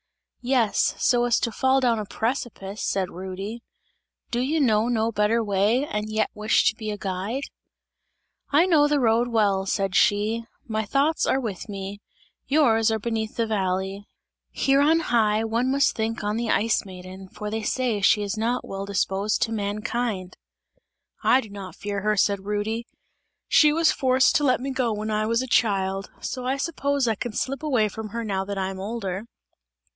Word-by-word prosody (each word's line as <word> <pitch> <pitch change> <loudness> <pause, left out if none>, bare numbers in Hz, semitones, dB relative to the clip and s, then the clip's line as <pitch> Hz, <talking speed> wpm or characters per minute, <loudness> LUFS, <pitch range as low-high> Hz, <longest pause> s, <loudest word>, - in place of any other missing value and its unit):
"Yes, 245 -4 +2
so 240 -1 +3
as 240 -1 +2
to 230 - 0
fall 265 +4 +2
down 240 -4 +2
a 210 - -4
precipice!" 220 -3 -3
said 190 -2 -1
Rudy; 190 +5 -6 0.7
"Do 240 - 0
you 290 +6 0
know 225 -5 +3
no 230 -1 +1
better 220 +2 +1
way, 210 +6 +2
and 210 -5 -3
yet 215 0 0
wish 215 +2 +2
to - - +2
be 220 -1 -5
a 210 - -3
guide?" 200 +7 -3 1.1
"I 300 +5 +4
know 310 -5 +4
the 295 -1 +2
road 235 -1 +3
well," 200 -4 +1
said 195 -1 0
she, 215 +4 +2 0.2
"my 220 -1 -1
thoughts 280 +8 +1
are 265 - +2
with 215 -5 -5
me; 200 0 -6 0.5
yours 230 -7 +3
are 220 - +1
beneath 220 0 -3
in - - +4
the 220 - -2
valley; 190 +1 -2 0.4
here 275 0 +2
on 320 +3 +4
high, 220 -6 +2
one 230 +3 0
must 275 +1 +2
think 225 0 -2
on 210 +1 -1
the 235 -1 -2
Ice 225 +1 +2
Maiden, 185 0 -10
for 210 +1 -6
they 220 +1 -2
say 235 -2 -1
she 205 +2 +4
is 200 +1 -2
not 235 +3 -1
well 195 0 -5
disposed 200 +1 0
to 225 - -2
mankind!" 210 -2 -3 0.9
"I 260 - +5
do 220 - -11
not 195 -4 -8
fear 200 -1 -4
her," 210 +1 +1
said 200 0 +1
Rudy, 220 +3 -2 0.6
"she 300 -1 +5
was 325 +1 +3
forced 260 0 +3
to 295 - -1
let 255 -3 +3
me 270 +2 -3
go 255 -3 0
when 215 0 -3
I 215 0 0
was 230 +2 +1
a - - -6
child, 195 -4 +1
so 255 -1 -4
I 265 +2 0
suppose 280 -3 -1
I 225 - +3
can 220 +2 -5
slip 275 +5 -2
away 255 -9 +2
from 215 +1 -7
her 235 +3 -4
now 195 -3 -1
that 200 0 -4
I 190 0 -1
am 190 - -8
older!" 200 -1 -4
220 Hz, 190 wpm, -24 LUFS, 200-245 Hz, 1.1 s, I